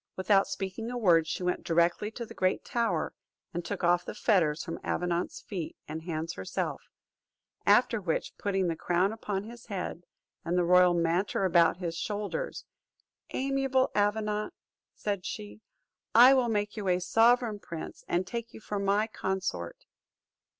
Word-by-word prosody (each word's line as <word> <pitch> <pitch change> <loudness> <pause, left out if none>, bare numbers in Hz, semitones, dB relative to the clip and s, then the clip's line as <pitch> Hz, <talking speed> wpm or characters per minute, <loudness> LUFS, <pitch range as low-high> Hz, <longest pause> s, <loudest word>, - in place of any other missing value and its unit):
Without 195 +1 +3
speaking 195 +4 -4
a 245 - -3
word, 170 -8 +4
she 180 - -3
went 180 0 -1
directly 170 +5 +2
to 235 +2 -6
the - - -11
great 185 0 0
tower, 235 -1 0 0.4
and 175 0 -3
took 200 +1 -5
off 175 0 +3
the - - -7
fetters 175 -9 +2
from 165 - -5
Avenant's 175 0 -1
feet 180 -6 -6
and 160 +1 -5
hands 165 0 -3
herself; 95 0 -3 0.9
after 215 +2 +4
which, 170 -4 -2
putting 195 -2 0
the 165 - -1
crown 180 +5 +1
upon 205 -3 -3
his 235 +2 -11
head, 185 -4 -4 0.4
and 175 +2 -1
the 180 - +3
royal 180 0 +5
mantle 175 +4 +1
about 170 -2 +4
his 170 -2 -4
shoulders, 210 - -3 0.7
"Amiable 270 -1 +1
Avenant," 210 +1 0 0.4
said 200 -3 -2
she, 210 +1 -7 0.5
"I 250 +3 +9
will 255 -3 +3
make 205 -1 -1
you 210 -3 -4
a 180 0 +3
sovereign 225 +3 +3
prince, 165 -4 -8
and 175 +2 0
take 230 +4 -6
you - - -9
for 205 -2 -4
my 200 +2 +2
consort." 190 - -4
195 Hz, 155 wpm, -29 LUFS, 175-220 Hz, 0.9 s, I